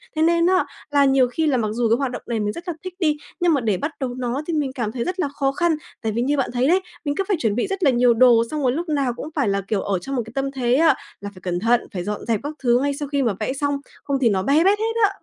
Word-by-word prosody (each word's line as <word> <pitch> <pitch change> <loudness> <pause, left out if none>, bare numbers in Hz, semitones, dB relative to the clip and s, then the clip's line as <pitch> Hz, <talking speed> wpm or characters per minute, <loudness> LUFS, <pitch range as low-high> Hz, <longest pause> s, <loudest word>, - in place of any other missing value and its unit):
Thế 310 - 0
nên 335 +1 +3
á 370 +1 +3 0.3
là 285 -1 +4
nhiều 265 -2 +4
khi 315 +6 -1
là 275 -4 +2
mặc 220 -3 0
dù 235 0 0
cái 230 - +4
hoạt 270 -2 -1
động - - -6
này 235 -2 -1
mình 210 -1 -1
rất 345 - -9
là 350 - -1
thích 370 -1 -6
đi, 305 -4 +2 0.2
nhưng 345 -2 +3
mà 280 - +1
để 215 -5 +1
bắt 290 - -3
đầu 250 -2 -3
nó 250 +2 -2
thì 335 - -2
mình 285 -4 -1
cảm 235 -5 -2
thấy 235 0 -3
rất 365 +1 -4
là 300 - +1
khó 275 -1 -1
khăn. 325 +3 +1 0.3
Tại 225 - -1
vì 235 +3 -1
như 285 +3 +1
bạn 270 - 0
thấy 250 +2 +1
đấy, 370 +4 +4 0.2
mình 285 0 -1
cứ 390 - 0
phải 395 -5 +1
chuẩn 220 -7 0
bị 245 - 0
rất 390 -1 -3
là 285 - +6
nhiều 245 -1 +4
đồ, 230 -1 +5
xong 305 -1 -2
rồi 250 - +3
lúc 330 +5 -3
nào 280 -5 0
cũng 300 - -6
phải 280 -7 +1
là, 200 0 0
kiểu, 205 -2 0
ở 195 -3 -1
trong 270 +9 -5
một 245 - +1
cái 225 - -11
tâm 275 0 -1
thế 250 -2 +1
á 315 -1 +5 0.3
là 205 - -5
phải 185 - -15
cẩn 175 -1 -2
thận, 235 +3 +3
phải 180 - -3
dọn 210 +2 -4
dẹp 225 -2 0
các 290 - -4
thứ 240 -1 +4
ngay 285 0 0
sau 290 +1 -5
khi 280 -1 0
mà 230 -5 +1
vẽ 220 +4 -1
xong, 285 +1 -1 0.3
không 280 -1 0
thì 235 - +4
nó 190 -2 0
be 290 +8 +3
bét 400 +3 +3
hết 450 +1 -1
á. 410 - +6
270 Hz, 330 wpm, -22 LUFS, 235-305 Hz, 0.3 s, là